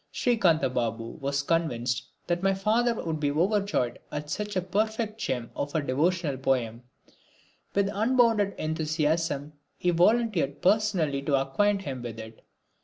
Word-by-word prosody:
Srikantha 180 - +2
Babu 115 -2 -3
was 140 +1 -1
convinced 125 -6 0 0.2
that 175 0 -1
my 195 0 +2
father 225 +5 +2
would 160 -6 -3
be 145 -1 +1
overjoyed 180 - 0
at 150 0 -5
such 210 0 -3
a 185 - +2
perfect 220 +3 -1
gem 125 -3 -2
of 145 +2 -4
a 160 - +2
devotional 150 +2 0
poem. 125 -3 0 0.9
With 200 0 +3
unbounded 225 -2 +3
enthusiasm 155 -1 -1 0.2
he 180 - +1
volunteered 180 - +2
personally 185 -9 +2
to 140 -1 +2
acquaint 195 +9 +1
him 130 -6 -5
with 120 -2 -6
it. 110 0 -10
160 Hz, 140 wpm, -27 LUFS, 135-205 Hz, 0.9 s, With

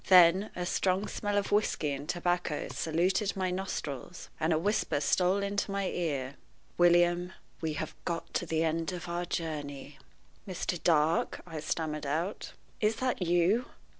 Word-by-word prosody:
Then 185 +2 +7
a 180 - -2
strong 185 +3 +1
smell 205 -1 -2
of 200 - 0
whisky 205 -7 +1
and 140 +1 -5
tobacco 175 -3 -1
saluted 185 +5 0
my 185 -1 0
nostrils, 180 -5 -4
and 160 +1 +1
a 160 - +4
whisper 165 -4 +1
stole 185 +6 +2
into 200 +1 -1
my 195 -1 -1
ear 140 -6 -2 0.4
"William, 175 +1 +4 0.3
we 160 -2 -1
have 155 +1 -4
got 170 -2 -3
to 175 - -1
the 160 0 +1
end 165 +2 0
of 175 0 -6
our 175 +1 -2
journey." 145 -4 -4 0.5
"Mr. 180 -2 -3
Dark," 160 -1 +2
I 165 -3 -6
stammered 150 -1 -2
out, 165 +8 -2 0.3
"is 215 +1 +2
that 255 -4 -1
you? 175 +7 +3
175 Hz, 155 wpm, -30 LUFS, 160-190 Hz, 0.5 s, Then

